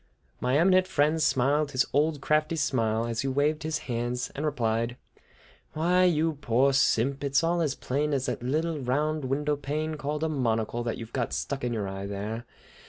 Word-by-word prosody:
My 125 +3 +1
eminent 185 +3 +4
friend 155 0 +2
smiled 145 0 +2
his 130 +1 +3
old 150 +1 +2
crafty 155 +2 +1
smile, 115 -7 0
as 115 -1 -2
he 135 - -2
waved 145 +3 +1
his 155 0 -1
hands, 120 +1 -2
and 145 - -4
replied: 120 -4 -1 0.8
"Why, 180 +4 +3
you 160 -3 +1
poor 130 +3 +3
simp, 135 +1 +2
it's 140 +2 +2
all 170 +1 +1
as 150 -4 0
plain 145 +3 -1
as 135 -2 0
that 125 -4 -3
little 155 +5 -1
round 145 +3 -1
window 145 +3 0
pane 150 +3 -3
called 150 +1 -3
a - - +2
monocle 120 -5 -1
that 115 - -2
you've 115 -1 -9
got 120 -3 -1
stuck 140 -2 -3
in 125 - -1
your 105 -4 -2
eye 95 +1 -5
there. 105 +4 -5
140 Hz, 185 wpm, -27 LUFS, 120-155 Hz, 0.8 s, eminent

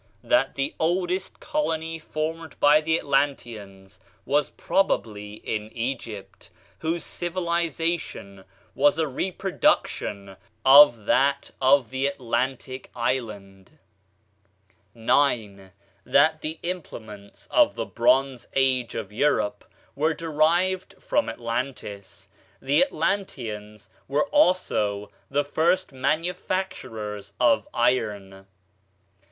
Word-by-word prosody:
That 305 - +2
the 140 +1 -2
oldest 180 +3 -1
colony 160 - -2
formed 160 0 -5
by 150 +1 +6
the 160 +1 +1
Atlanteans 110 - -2 0.3
was 145 +1 +1
probably 105 - -1
in 110 0 -5
Egypt, 115 -4 -5 0.3
whose 165 +1 -2
civilization 170 - -3 0.3
was 145 +2 +3
a 160 - +2
reproduction 130 - -1 0.3
of 135 -5 +8
that 140 +4 +2
of 130 -2 +4
the 130 +1 0
Atlantic 130 0 -3
island. 115 -2 -4 1.2
9. 110 -5 +1 0.3
That 155 +3 +3
the 155 +1 -4
implements 110 - -7
of - - +4
the - - -3
"Bronze 135 -2 +1
Age" 130 -3 +1
of - - -5
Europe 115 -4 +1 0.3
were 155 +3 +1
derived 170 +4 +1
from 295 - 0
Atlantis. 115 -4 -5 0.3
The 140 - +3
Atlanteans 120 - -3 0.2
were 145 +2 +1
also 105 - +1 0.2
the 145 +1 +1
first 170 +5 +1
manufacturers 135 - -3
of 120 -2 +3
iron. 105 -6 -1
135 Hz, 95 wpm, -25 LUFS, 110-160 Hz, 1.2 s, of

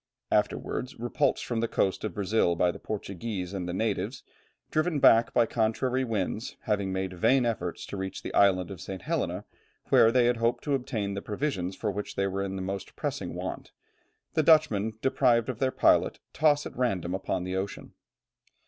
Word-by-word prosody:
Afterwards, 130 0 -1
repulsed 120 +1 0
from 120 -2 -2
the 115 - +1
coast 95 -3 0
of 110 - -3
Brazil 100 -3 +2
by 90 +1 +2
the - - -10
Portuguese 100 -2 -5
and 90 -2 -3
the - - -1
natives, 105 +3 -2 0.5
driven 155 0 +1
back 115 -3 +6
by - - +4
contrary 120 +4 0
winds, 110 -1 -3
having 100 -3 -1
made 95 0 -2
vain 125 +8 +3
efforts 115 -3 -2
to 100 - -6
reach 95 0 -5
the - - -5
island 95 -2 +3
of 95 - -8
St. 95 -1 -7
Helena, 105 - -2 0.4
where 115 - +6
they 125 0 +4
had 120 0 +2
hoped 115 +1 0
to 145 - -1
obtain 110 -6 -2
the 100 - -4
provisions 100 -6 -3
of 105 -2 0
which 105 +1 -5
they 100 - +1
were 95 0 -2
in 95 -1 -3
the 95 - -4
most 95 +1 -5
pressing - - -4
want, - - -6 0.6
the - - +3
Dutchmen, 150 -10 +4
deprived 125 -3 +3
of 125 - -4
their 130 - +2
pilot, - - +3 0.2
toss 150 0 +3
at - - -7
random 95 -9 -1
upon 95 -1 -2
the 90 +1 -3
ocean. 95 +1 -4
110 Hz, 185 wpm, -28 LUFS, 95-125 Hz, 0.6 s, back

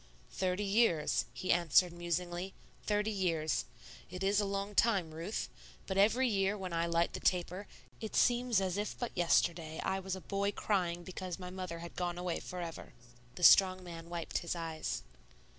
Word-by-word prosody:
"Thirty 185 +2 -1
years," 200 -6 +2
he 185 - -2
answered 170 +1 +4
musingly, 175 +2 -3 0.3
"thirty 210 +1 +1
years. 165 -6 0 0.4
It 180 +1 -6
is 200 +1 +3
a - - 0
long 200 +1 -3
time, 195 -7 +2
Ruth; 170 +7 -3 0.4
but 190 - -3
every 225 +7 +4
year 200 -2 +1
when 185 -3 -5
I 170 0 +1
light 170 0 +1
the - - -4
taper 180 +2 0 0.3
it 220 - -5
seems 245 -3 +3
as 190 0 -1
if 210 - -3
but 240 - -4
yesterday 165 -2 +1
I 190 0 0
was 190 0 -3
a 190 - -8
boy 200 +2 -1
crying 175 -5 0
because 185 0 -5
my 180 -1 -7
mother 185 -2 -5
had 170 - -10
gone 175 -1 -2
away 175 -1 -2
forever." 175 -2 -7 0.4
The 180 - -7
strong 185 0 +7
man 170 -1 -9
wiped 170 -1 -3
his 170 - -3
eyes. 165 - -3
185 Hz, 175 wpm, -33 LUFS, 170-200 Hz, 0.4 s, strong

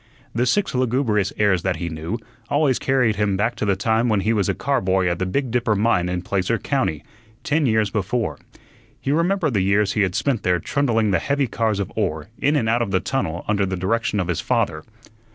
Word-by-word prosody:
The 120 +2 +1
six 200 +9 +1
lugubrious 120 -6 +1
airs 100 -4 +3
that 95 0 0
he 85 +2 -4
knew, 80 +6 -4 0.3
always 145 -3 +2
carried 125 -6 +1
him 105 -2 +1
back 110 +4 +1
to - - -1
the 100 -1 +2
time 110 +4 +1
when 105 -3 +2
he 110 +4 +1
was 100 -4 +1
a - - 0
car - - 0
boy 95 0 +1
at 85 -1 -1
the 95 - -1
Big 130 +5 -1
Dipper 120 -3 +1
Mine 100 -4 +2
in 90 0 -2
Placer 100 +4 0
County, 130 - -1 0.4
ten 150 -1 +1
years 110 -2 +2
before. 110 +3 -2 0.6
He 135 - -2
remembered 170 -1 +1
the 100 - +2
years 100 +1 +2
he 110 - +1
had 95 -2 0
spent 130 -7 0
there 90 -1 +2
trundling 115 - 0
the 95 - +2
heavy 140 0 0
cars 110 -4 -1
of 100 - -3
ore 90 -5 -2
in 145 +2 +2
and 125 -7 +1
out 115 +2 +2
of 115 - -1
the 95 -1 +2
tunnel 90 -9 -3
under 105 -2 +1
the 95 0 -3
direction 105 +3 0
of 90 - -1
his 85 -3 -1
father. - - 0
105 Hz, 225 wpm, -22 LUFS, 95-125 Hz, 0.6 s, airs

